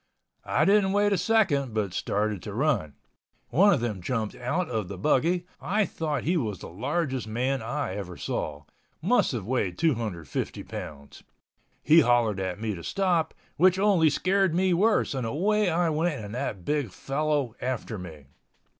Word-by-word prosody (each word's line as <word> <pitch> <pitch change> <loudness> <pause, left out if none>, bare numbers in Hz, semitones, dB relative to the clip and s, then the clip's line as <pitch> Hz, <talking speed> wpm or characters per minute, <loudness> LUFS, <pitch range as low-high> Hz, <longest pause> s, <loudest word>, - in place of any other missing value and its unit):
I - - +2
didn't 195 -1 +4
wait 205 0 +3
a - - +2
second 165 - +2
but 100 -5 -1
started 105 +1 -1
to 105 +2 -7
run. 120 - 0 0.5
One 195 +10 +5
of 150 -10 +2
them 110 -6 -3
jumped 110 +1 -2
out 150 +9 -2
of 110 -6 -2
the 100 0 -7
buggy. 170 - +1 0.2
I 205 +4 +1
thought 155 -5 -3
he 175 +4 +1
was 110 - -2
the - - -10
largest 130 - -2
man 125 +4 -1
I 125 -1 -3
ever 90 -3 -6
saw—must 80 - -2
have 110 -6 -3
weighed 105 -7 -1
250 110 - -2
pounds. 70 -1 -9 0.6
He 155 +4 +7
hollered 120 - +3
at 95 0 -3
me 110 -1 -2
to 85 -3 -8
stop, 180 -5 0 0.2
which 185 +3 +5
only 190 -5 +4
scared 190 +3 +1
me 185 0 +3
worse 210 +1 +2
and 130 -4 -2
away 205 - +1
I 170 0 +1
went 160 +1 0
and 105 - -8
that 110 -8 -4
big 145 -6 0
fellow 140 +2 -1
after 120 -4 -3
me. 80 -6 -10
135 Hz, 165 wpm, -27 LUFS, 105-175 Hz, 0.6 s, He